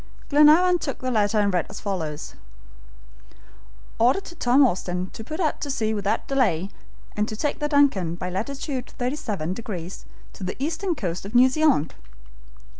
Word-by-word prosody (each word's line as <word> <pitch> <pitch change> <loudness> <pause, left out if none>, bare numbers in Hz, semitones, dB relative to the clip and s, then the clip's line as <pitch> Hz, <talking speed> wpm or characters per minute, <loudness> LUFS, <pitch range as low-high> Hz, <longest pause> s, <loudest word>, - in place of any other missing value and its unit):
Glenarvan 315 +5 +6
took 275 - -4
the 255 0 -3
letter 215 -2 +2
and 205 -2 +2
read 180 - 0
as 205 - -8
follows: 160 -7 -4 1.7
"Order 245 +10 +4
to 345 - -11
Tom 265 -2 +4
Austin 180 -4 -2
to 225 - -8
put 310 +8 -6
out 315 -5 0
to 290 - -3
sea 220 -5 0
without 205 -1 -1
delay, 205 -10 +1 0.5
and 210 0 0
to 215 - -5
take 290 +5 -1
the 295 -1 -1
Duncan, 265 - +3
by 180 +1 -5
latitude 260 - -4
37 245 - -2
degrees 190 -5 -7 0.3
to - - -9
the 185 - -3
eastern 330 +6 -2
coast 180 - -4
of 200 +5 -8
New 255 +2 +7
Zealand!" 280 - +2
230 Hz, 165 wpm, -24 LUFS, 190-285 Hz, 1.7 s, New